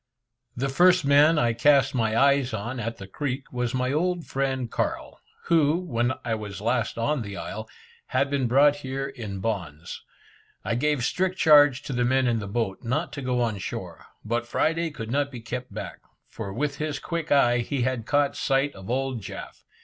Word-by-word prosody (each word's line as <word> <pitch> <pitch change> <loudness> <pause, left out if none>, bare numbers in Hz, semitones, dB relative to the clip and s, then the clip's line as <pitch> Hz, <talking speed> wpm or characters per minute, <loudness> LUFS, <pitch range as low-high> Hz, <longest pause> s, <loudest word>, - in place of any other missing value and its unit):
The 135 +3 0
first 180 +4 +4
man 145 +3 +5
I 120 -4 +2
cast 140 +3 +4
my 110 -3 +1
eyes 140 -2 +3
on 120 +5 -4
at 115 0 -4
the 100 - -8
creek, 135 +6 -4
was 125 0 -1
my 125 0 0
old 175 +2 0
friend 130 -3 -2
Carl, - - -3 0.2
who, 160 -1 +3
when 130 -8 -1
I 115 - 0
was 105 -2 -5
last 115 +2 -1
on 140 +4 0
the 100 -2 -6
isle, 110 +2 -6 0.4
had 140 - +1
been 135 -3 +1
brought 140 +4 +5
here 135 -1 -4
in 110 -8 -7
bonds. 90 -7 -4 0.6
I - - 0
gave 145 +1 +1
strict 185 +7 0
charge 145 -4 +6
to 135 - -5
the 125 0 +1
men 130 +2 +2
in 120 -2 +1
the 100 - -5
boat 100 -2 -2
not 145 +8 -2
to 140 - -5
go 125 -1 0
on 110 -4 -1
shore, - - -7 0.2
but 120 +2 -1
Friday 165 +6 0
could 115 -7 -7
not 140 +1 +1
be 125 -4 -8
kept 125 +2 -6
back, - - -7 0.3
for 100 - -7
with 140 +6 -2
his 150 -2 -2
quick 170 +1 -4
eye 120 -4 +4
he 125 +2 -1
had 125 -3 -2
caught 145 -1 +2
sight 135 +1 +1
of 95 +2 -11
old 130 -1 -1
Jaf. - - -9
130 Hz, 195 wpm, -25 LUFS, 115-145 Hz, 0.6 s, charge